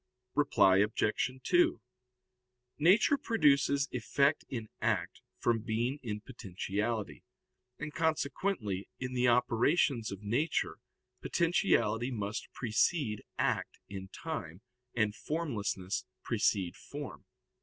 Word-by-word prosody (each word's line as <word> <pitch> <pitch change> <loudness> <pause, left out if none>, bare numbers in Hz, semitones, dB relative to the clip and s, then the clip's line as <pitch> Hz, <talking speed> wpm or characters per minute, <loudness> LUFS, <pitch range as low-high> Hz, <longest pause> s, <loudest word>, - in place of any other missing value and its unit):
Reply 120 -10 +4
Obj. 105 +3 +2
2: 350 -1 +3 1.0
Nature 200 - +5
produces 140 -8 +3
effect 140 +5 +1
in 115 -4 -4
act - - 0 0.2
from 120 -1 +1
being 120 +5 -1
in 105 -4 -4
potentiality; 105 - -3 0.5
and 150 - -6
consequently 155 - -1
in 130 -1 -4
the 125 0 +2
operations 120 +1 +2
of 100 +1 -7
nature 125 +10 0 0.4
potentiality 120 - +2
must 105 -3 -4
precede 115 0 0
act - - 0
in 95 -1 -6
time, 105 - -6 0.3
and 110 -3 +1
formlessness 105 - -2 0.2
precede 90 -3 +1
form. - - -8
120 Hz, 100 wpm, -32 LUFS, 105-145 Hz, 1.0 s, Nature